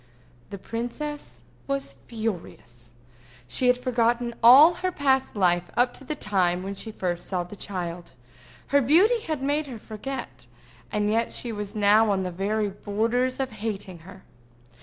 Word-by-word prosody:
The 200 Hz, -, -6 dB
princess 245 Hz, +8 st, -6 dB, 0.2 s
was 275 Hz, 0 st, -3 dB
furious. 165 Hz, -, -7 dB, 0.5 s
She 250 Hz, -, +1 dB
had 250 Hz, 0 st, +5 dB
forgotten 240 Hz, -1 st, 0 dB
all 270 Hz, +8 st, +9 dB
her 365 Hz, +1 st, -2 dB
past 265 Hz, -6 st, +1 dB
life 175 Hz, -3 st, +2 dB
up 245 Hz, 0 st, +3 dB
to -, -, -11 dB
the 300 Hz, +3 st, -4 dB
time 185 Hz, -7 st, 0 dB
when 195 Hz, +1 st, -4 dB
she 220 Hz, +3 st, -5 dB
first 175 Hz, -4 st, -3 dB
saw 180 Hz, -2 st, -1 dB
the 180 Hz, +4 st, -10 dB
child: 175 Hz, -3 st, -5 dB, 0.6 s
her 285 Hz, 0 st, +4 dB
beauty 365 Hz, -, +4 dB
had 310 Hz, -10 st, -4 dB
made 290 Hz, +2 st, 0 dB
her 250 Hz, -4 st, -7 dB
forget, 230 Hz, +5 st, -7 dB, 0.4 s
and 210 Hz, 0 st, 0 dB
yet 230 Hz, +1 st, +1 dB
she 240 Hz, -, -2 dB
was 210 Hz, -1 st, -6 dB
now 210 Hz, +1 st, +4 dB
on 195 Hz, -2 st, +1 dB
the 180 Hz, -, -3 dB
very 205 Hz, +4 st, -1 dB
borders 230 Hz, +6 st, -1 dB
of 265 Hz, -1 st, -2 dB
hating 205 Hz, -5 st, -5 dB
her. 190 Hz, +3 st, -14 dB
220 Hz, 160 wpm, -25 LUFS, 195-260 Hz, 0.6 s, all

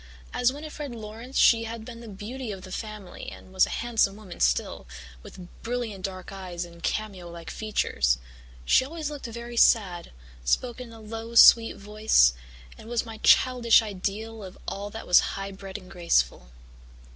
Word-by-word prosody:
As 245 Hz, 0 st, +3 dB
Winnifred 295 Hz, -2 st, -7 dB
Laurance 225 Hz, +4 st, -7 dB
she 230 Hz, -1 st, +5 dB
had 225 Hz, 0 st, -6 dB
been 230 Hz, -1 st, -9 dB
the 235 Hz, -, -10 dB
beauty 220 Hz, +4 st, -6 dB
of 190 Hz, -2 st, -8 dB
the 185 Hz, -, -10 dB
family 210 Hz, -3 st, -7 dB
and 185 Hz, -, -13 dB
was 190 Hz, -, +4 dB
a -, -, -4 dB
handsome 225 Hz, -4 st, +2 dB
woman 210 Hz, -4 st, -11 dB
still, 60 Hz, 0 st, 0 dB, 0.3 s
with 180 Hz, -, -11 dB
brilliant 225 Hz, -5 st, -3 dB
dark 185 Hz, -1 st, -7 dB
eyes 180 Hz, -3 st, -5 dB
and 170 Hz, 0 st, -14 dB
cameo 195 Hz, -5 st, -3 dB
like 170 Hz, -1 st, -8 dB
features. 65 Hz, -, 0 dB, 0.5 s
She -, -, +5 dB
always 305 Hz, +2 st, -5 dB
looked 290 Hz, -4 st, -6 dB
very 235 Hz, +1 st, -7 dB
sad, 185 Hz, -8 st, +3 dB, 0.3 s
spoke 240 Hz, -, 0 dB
in 240 Hz, -2 st, -9 dB
a 225 Hz, -, -12 dB
low 225 Hz, +2 st, -7 dB
sweet 230 Hz, 0 st, +8 dB
voice, 210 Hz, -, +3 dB, 0.5 s
and 220 Hz, -, -11 dB
was 240 Hz, -1 st, 0 dB
my 225 Hz, -1 st, -8 dB
childish 240 Hz, -3 st, +5 dB
ideal 215 Hz, +2 st, -4 dB
of 185 Hz, -1 st, -10 dB
all 200 Hz, +1 st, -4 dB
that 225 Hz, +2 st, -8 dB
was 180 Hz, -, +7 dB, 0.2 s
high 195 Hz, 0 st, -5 dB
bred 195 Hz, 0 st, -8 dB
and 185 Hz, -2 st, -14 dB
graceful. -, -, +1 dB
215 Hz, 170 wpm, -26 LUFS, 185-235 Hz, 0.5 s, sweet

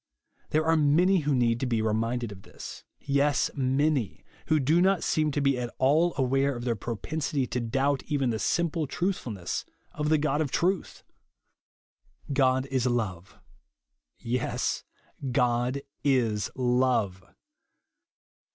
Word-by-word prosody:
There 155 Hz, +1 st, +1 dB
are 165 Hz, 0 st, +4 dB
many 165 Hz, +6 st, +4 dB
who 145 Hz, -2 st, 0 dB
need 120 Hz, -2 st, +2 dB
to 130 Hz, -, -1 dB
be 115 Hz, -2 st, 0 dB
reminded 115 Hz, +2 st, -1 dB
of 95 Hz, -1 st, -10 dB
this; -, -, -10 dB
— -, -, -54 dB
yes, 140 Hz, +1 st, +1 dB
many, 135 Hz, -3 st, 0 dB, 0.2 s
who 155 Hz, -, +3 dB
do 155 Hz, +6 st, +3 dB
not 190 Hz, -1 st, +3 dB
seem 155 Hz, -1 st, +1 dB
to 145 Hz, 0 st, -1 dB
be 140 Hz, -2 st, +2 dB
at 120 Hz, -1 st, -3 dB
all 155 Hz, +6 st, +3 dB
aware 135 Hz, +1 st, +1 dB
of 120 Hz, -, -6 dB
tXieir 120 Hz, -4 st, -1 dB
propensity 140 Hz, +5 st, -2 dB
to 125 Hz, -, -3 dB
doubt 135 Hz, +4 st, 0 dB
even 140 Hz, -5 st, 0 dB
the 110 Hz, -, -2 dB
simple 165 Hz, -, 0 dB
truthfulness 130 Hz, -, -3 dB, 0.3 s
of 150 Hz, 0 st, -2 dB
the 155 Hz, -, +4 dB
God 150 Hz, 0 st, 0 dB
of 150 Hz, -, -1 dB
truth. 180 Hz, +7 st, -1 dB, 1.3 s
God 130 Hz, -1 st, +3 dB
is 130 Hz, -2 st, +1 dB
love. 100 Hz, -7 st, -2 dB, 0.8 s
Yes, 125 Hz, +1 st, -2 dB, 0.5 s
God 125 Hz, +2 st, +1 dB, 0.2 s
is 115 Hz, -7 st, +1 dB
love. 125 Hz, -6 st, +1 dB
135 Hz, 140 wpm, -27 LUFS, 120-150 Hz, 1.3 s, are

